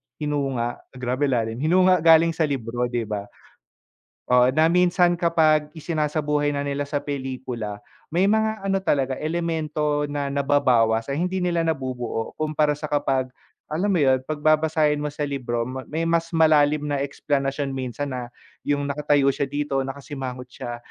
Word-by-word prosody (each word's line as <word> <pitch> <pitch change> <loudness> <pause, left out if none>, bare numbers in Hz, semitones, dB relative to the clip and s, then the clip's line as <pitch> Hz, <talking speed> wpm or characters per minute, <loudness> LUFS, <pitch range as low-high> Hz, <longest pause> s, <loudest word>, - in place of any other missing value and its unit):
hinunga, 135 -5 -2 0.2
grabe 125 +3 -1
lalim. 115 -3 -1
Hinunga 180 +4 +4
galing 165 +1 +6
sa 160 -1 0
libro, 125 -3 -2
di 120 -1 -2
ba? 105 -2 -5 1.0
Oo, 125 +1 +5
na 155 +3 +4
minsan 175 0 +3
kapag 155 -3 +2
isinasabuhay 150 -2 -1
na 140 - -2
nila 140 0 -2
sa 145 0 -2
pelikula, 130 -7 -5 0.3
may 185 +4 +3
mga 220 0 +1
ano 195 0 0
talaga, 135 -5 +1
elemento 155 -2 -1
na 145 -1 -3
nababawas, 130 -5 +2
ay 140 - -2
hindi 180 +3 -1
nila 170 -2 0
nabubuo. 130 -7 -3
Kumpara 155 -1 +1
sa 150 - -11
kapag, 135 -3 0 0.4
alam 180 +7 0
mo 195 - +2
yun? 130 -5 +3
'Pag 150 -1 -4
babasahin 155 -1 +3
mo 150 - -2
sa 145 0 -4
libro, 125 -5 -2 0.2
may 160 +2 -2
mas 165 0 +1
malalim 150 -2 +4
na 145 -1 -1
eksplanasyon 140 0 -2
minsan 135 +1 -4
na, 125 -1 -5 0.4
yung 145 -1 +1
nakatayo 145 -1 +2
siya 140 +1 -2
dito, 145 -1 -1
nakasimangot 135 -1 -6
siya, 120 -3 -6
145 Hz, 150 wpm, -23 LUFS, 130-155 Hz, 1.0 s, galing